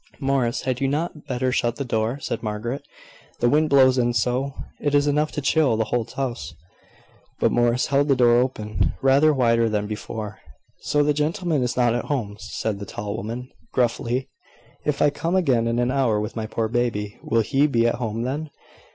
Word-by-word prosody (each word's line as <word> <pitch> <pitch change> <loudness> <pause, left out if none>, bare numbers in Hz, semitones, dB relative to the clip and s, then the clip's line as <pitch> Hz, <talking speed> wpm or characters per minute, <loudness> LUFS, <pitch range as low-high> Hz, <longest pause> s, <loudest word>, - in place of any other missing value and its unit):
"Morris, 135 -4 0
had 130 -1 -2
you 135 - +2
not 150 +1 -3
better 130 -1 0
shut 120 -2 0
the 140 - -4
door?" 115 +1 -1
said 115 - -4
Margaret; 115 +5 -3 0.6
"the 120 - +3
wind 150 +4 +3
blows 130 -2 +5
in 120 0 +2
so, 125 +4 0 0.2
it 145 0 0
is 145 0 +4
enough 150 +1 +1
to 150 - -2
chill 135 -4 +2
the 110 - +2
whole 120 -2 +1
house." 125 -10 -4 0.8
But - - +3
Morris 120 +1 +2
held 140 +1 +2
the 140 - +4
door 120 -1 +5
open, 110 -6 -1
rather 140 +3 +5
wider 115 -4 +3
than 105 -1 -1
before. 105 0 -6 0.4
"So 145 0 +1
the 150 0 +2
gentleman 155 +1 0
is 125 0 -1
not 120 -2 +3
at 120 - -2
home," 110 -8 -2
said 110 -1 -3
the 100 - -6
tall 105 0 -5
woman, 115 +5 -5 0.2
gruffly. 125 +1 0 0.6
"If 150 - +1
I 145 - +4
come 165 +5 -2
again 130 -11 +2
in 115 0 0
an 120 +1 +1
hour 130 -6 +2
with 105 0 -4
my 110 -2 -3
poor 110 0 -1
baby, 115 -3 -2
will 115 - +1
he 135 +6 +2
be 115 -5 +2
at 120 - +3
home 115 0 -2
then?" 145 +5 -3
125 Hz, 195 wpm, -23 LUFS, 115-140 Hz, 0.8 s, blows